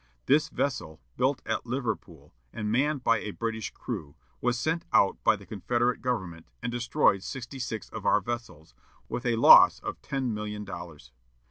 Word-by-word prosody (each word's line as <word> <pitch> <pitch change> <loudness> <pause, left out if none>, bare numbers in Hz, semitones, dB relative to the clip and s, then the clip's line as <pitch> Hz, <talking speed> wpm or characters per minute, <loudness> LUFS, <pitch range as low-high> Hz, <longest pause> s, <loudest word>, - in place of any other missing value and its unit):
This 150 +4 +3
vessel, 85 - -3 0.2
built 130 +2 0
at 110 +2 -2
Liverpool, 110 - -4 0.2
and 105 -1 -3
manned 140 +3 +1
by 115 -2 +3
a 105 - -5
British 110 +1 -3
crew, 70 -2 -6 0.3
was 125 0 +1
sent 160 +6 -1
out 100 - +3
by - - +5
the - - -13
Confederate 120 0 -1
government, 90 -10 -3 0.2
and 125 - -2
destroyed 120 -5 +2
sixty 130 +3 -7
six 110 -5 -4
of - - -7
our - - +4
vessels, 105 - -6 0.3
with 125 - -4
a 120 - +2
loss 115 - +8
of - - -6
ten 130 -4 -2
million 105 0 -5
dollars. 85 -5 -9
115 Hz, 165 wpm, -28 LUFS, 100-125 Hz, 0.3 s, loss